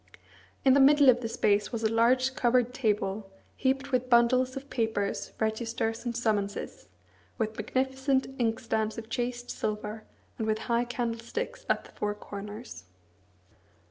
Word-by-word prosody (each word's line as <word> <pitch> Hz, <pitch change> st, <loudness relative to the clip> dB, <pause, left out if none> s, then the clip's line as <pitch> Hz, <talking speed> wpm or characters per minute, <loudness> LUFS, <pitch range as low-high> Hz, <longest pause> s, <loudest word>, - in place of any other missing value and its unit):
In 265 Hz, -, +7 dB
the 280 Hz, -, +5 dB
middle 285 Hz, 0 st, +7 dB
of 245 Hz, -1 st, +5 dB
the 225 Hz, -, -3 dB
space 205 Hz, -2 st, +1 dB
was 230 Hz, -2 st, -3 dB
a 220 Hz, 0 st, +1 dB
large 255 Hz, +3 st, +3 dB
covered 250 Hz, -1 st, +2 dB
table, 210 Hz, -4 st, -1 dB, 0.3 s
heaped 270 Hz, +1 st, 0 dB
with 255 Hz, -1 st, 0 dB
bundles 255 Hz, +2 st, +4 dB
of 270 Hz, +1 st, -7 dB
papers, 220 Hz, -4 st, -1 dB
registers, 225 Hz, +1 st, -1 dB
and 240 Hz, -1 st, -2 dB
summonses, 205 Hz, -4 st, -2 dB, 0.5 s
with 220 Hz, 0 st, -1 dB
magnificent 265 Hz, +4 st, 0 dB
inkstands 225 Hz, -1 st, 0 dB
of 225 Hz, 0 st, -7 dB
chased 245 Hz, 0 st, -2 dB
silver, 215 Hz, +1 st, -3 dB, 0.4 s
and 220 Hz, -, -1 dB
with 215 Hz, 0 st, +1 dB
high 235 Hz, 0 st, +1 dB
candlesticks 240 Hz, -, -4 dB
at -, -, +2 dB
the -, -, -15 dB
four 210 Hz, 0 st, -2 dB
corners. 205 Hz, -, -8 dB
235 Hz, 140 wpm, -29 LUFS, 220-255 Hz, 0.5 s, In